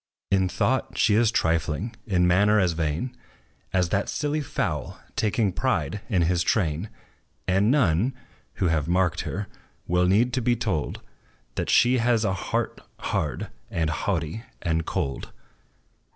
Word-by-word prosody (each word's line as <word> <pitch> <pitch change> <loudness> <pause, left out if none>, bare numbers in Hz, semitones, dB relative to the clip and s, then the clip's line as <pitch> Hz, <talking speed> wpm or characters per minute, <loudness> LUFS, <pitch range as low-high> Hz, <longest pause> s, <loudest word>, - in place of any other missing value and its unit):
In 95 -1 +3
thought 130 +5 0
she 105 - +4
is 115 +1 +4
trifling 85 +2 0
in 90 -4 +3
manner 100 +4 +4
as 90 -3 +3
vain 80 - -2 0.6
As 90 -2 +2
that 100 +1 0
silly 150 +1 -1
fowl, 145 - -3 0.2
taking 105 -1 +1
pride 95 - -1
in 90 -4 +2
his 85 +1 +2
train; 85 0 0 0.6
And 95 +3 +3
none, 120 - +2 0.4
who - - -1
have 75 -2 +1
marked 90 0 +2
her, 100 +2 -3 0.4
will 90 +1 +2
need 115 +7 +3
to 130 - +1
be 120 +1 +2
told 95 -10 -2 0.5
That - - -3
she 125 +1 +5
has 115 -1 +2
a 95 - +1
heart 95 - -2 0.2
hard, 75 -5 -2 0.2
and 80 -2 0
haughty, 85 +3 -2 0.2
and 80 -1 0
cold. 70 -1 -3
95 Hz, 145 wpm, -25 LUFS, 85-115 Hz, 0.6 s, she